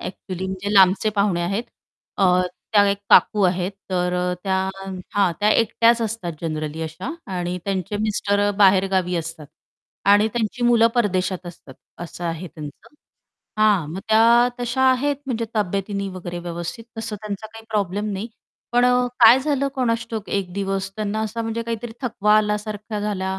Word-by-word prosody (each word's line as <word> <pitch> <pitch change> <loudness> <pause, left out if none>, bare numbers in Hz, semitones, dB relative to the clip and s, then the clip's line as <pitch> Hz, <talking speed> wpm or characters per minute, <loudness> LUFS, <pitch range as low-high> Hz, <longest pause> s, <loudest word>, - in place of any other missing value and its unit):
Actually 185 0 -6
म्हणजे 190 +2 -4
लांबचे 195 +3 +5
पाहुणे 200 -4 +2
आहेत, 200 +7 -1 0.5
अ, 195 - +2 0.5
त्या 205 -1 +6
एक 200 - -1
काकू 210 -2 +5
आहेत 180 +1 -2 0.2
तर 180 -1 0
अ, 180 0 0
त्या 190 -1 +1 0.6
हां. 195 -4 +3
त्या 210 +1 +3
एकट्याच 230 +1 +3
असतात 215 -6 -3
जनरली 155 -1 -4
अशा 160 - -5 0.3
आणि 180 0 -2
त्यांचे 195 0 -2
मिस्टर 205 -1 0
अ, - - +2
बाहेरगावी 190 -2 +3
असतात 165 -2 -6 0.6
आणि 205 +2 +6
त्यांची 240 +1 -2
मुलं 235 -1 +5
परदेशात 185 -5 0
असतात 165 -6 -11 0.3
असं 175 0 -7
आहे 165 +2 -3
त्यांचं, 150 - -11 0.6
हां, 205 -8 +3
मग 190 - -5
त्या 230 +2 +5
तशा 245 +2 -1
आहेत 280 +3 +1
म्हणजे 230 -3 -2
तब्येतीने 200 0 -1
वगैरे 175 -2 -6
व्यवस्थित 175 +5 -6
तसं 225 -1 -4
त्यांचा 210 +1 -6
काही 225 +1 -13
प्रॉब्लेम 205 0 -1
नाही. 200 +4 -4 0.4
पण 245 0 +4
अ, 250 0 +3
काय 235 +2 +9
झालं 280 -1 0
कोणास 230 -3 0
ठाऊक 220 -3 -5
एक 190 -3 -2
दिवस 195 0 -2
त्यांना 215 0 -2
असा 220 +2 -3
म्हणजे 225 +1 -3
काहीतरी 230 0 -5
थकवा 210 -3 +2
आल्यासारखा 210 0 -2
झाला 190 -2 -2
205 Hz, 160 wpm, -22 LUFS, 185-225 Hz, 0.6 s, काय